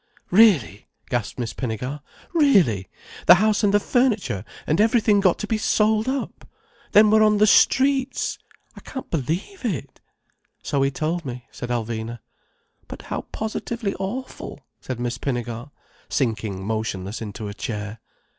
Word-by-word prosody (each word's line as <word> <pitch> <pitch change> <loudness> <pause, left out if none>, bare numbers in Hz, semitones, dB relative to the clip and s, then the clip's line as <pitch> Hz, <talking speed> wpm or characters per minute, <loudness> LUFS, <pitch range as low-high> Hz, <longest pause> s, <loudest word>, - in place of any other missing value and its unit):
"Really!" 175 - +4 0.2
gasped 120 -4 -2
Miss 120 -3 -3
Pinnegar. 125 +4 -4 0.3
"Really! 190 - +3 0.4
The 175 - +11
house 215 +3 +2
and 205 - +4
the 205 - +4
furniture 215 - +1 0.2
and 160 +7 +2
everything 220 -2 +4
got 190 -3 +3
to - - -4
be 215 0 -1
sold 215 +1 +2
up? 270 +1 -4 0.4
Then 210 0 +6
we're 215 0 +5
on 215 -1 +5
the 210 - +5
streets! 270 +4 +3 0.4
I - - -10
can't 265 - -8
believe 170 - -3
it." 195 - -4 0.6
"So 140 - 0
he 135 - +3
told 160 +5 -2
me," 125 -3 -7
said 120 - -7
Alvina. 115 -1 -3 0.7
"But - - -9
how - - -4
positively 220 -1 -3
awful," 235 - -5 0.2
said 130 -2 -6
Miss 120 0 -3
Pinnegar, 120 -1 -3 0.4
sinking 110 -7 -1
motionless 110 -2 -3
into 105 0 -6
a 100 - -5
chair. 105 -2 -5
155 Hz, 145 wpm, -23 LUFS, -, 0.7 s, The